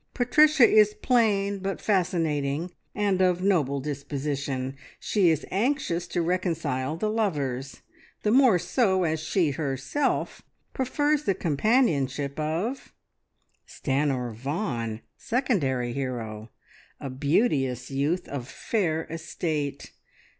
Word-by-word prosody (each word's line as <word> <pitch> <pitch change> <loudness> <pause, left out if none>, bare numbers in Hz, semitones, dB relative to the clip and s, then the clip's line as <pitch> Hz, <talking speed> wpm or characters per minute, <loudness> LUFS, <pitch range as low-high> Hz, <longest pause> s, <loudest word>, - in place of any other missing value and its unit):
Patricia 300 +2 +5
is 210 -1 +5
plain, 205 -5 +2
but 195 0 -3
fascinating, 165 -5 0 0.2
and 200 -3 +1
of 180 -1 +2
noble 150 -8 +2
disposition. 140 -1 -3 0.2
She 195 -5 +2
is 160 -3 0
anxious 195 -5 0
to 175 - -1
reconcile 165 -6 -1
the 215 - -1
lovers. 140 - -2 0.4
The 210 - +2
more 250 -5 +6
so 190 -1 +1
as 160 -1 0
she 160 0 +1
herself 140 - -1 0.3
prefers 290 +3 0
the 195 - +2
companionship 145 - +1
of: 170 - -2 0.8
"Stanor 135 -4 -1
Vaughan, 120 - -3 0.2
Secondary 140 - 0
Hero, 115 -5 -4 0.5
a 135 - -5
beauteous 135 - 0
youth 150 +7 0
of 130 -4 -5
fair 165 -3 -1
estate. 155 -3 -4
160 Hz, 105 wpm, -26 LUFS, 140-205 Hz, 0.8 s, more